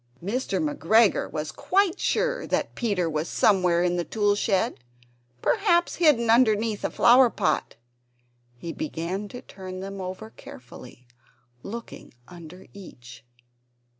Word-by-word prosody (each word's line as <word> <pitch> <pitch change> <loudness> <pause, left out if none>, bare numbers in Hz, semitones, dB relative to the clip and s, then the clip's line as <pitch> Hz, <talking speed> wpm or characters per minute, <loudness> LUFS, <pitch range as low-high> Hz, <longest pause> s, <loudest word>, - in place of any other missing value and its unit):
Mr. 225 +9 -2
McGregor 235 -8 +2
was 150 0 -4
quite 375 - 0
sure - - -1
that - - -1
Peter 200 -8 -1
was 155 0 -2
somewhere 180 -4 +2
in 175 0 0
the 175 - -1
tool 205 +2 +1
shed, 205 - 0 0.6
perhaps 350 -5 +2
hidden 295 -9 +3
underneath 225 -2 +2
a - - 0
flower 245 +1 +5
pot. 205 -4 -1 0.8
He 165 +6 -7
began 195 - -4
to 245 +4 -10
turn 185 -1 -9
them 195 0 -7
over 185 +4 -7
carefully, 125 0 -13 0.6
looking 230 - -9
under 175 +1 -12
each. 125 -11 -13
200 Hz, 125 wpm, -25 LUFS, 175-240 Hz, 0.8 s, flower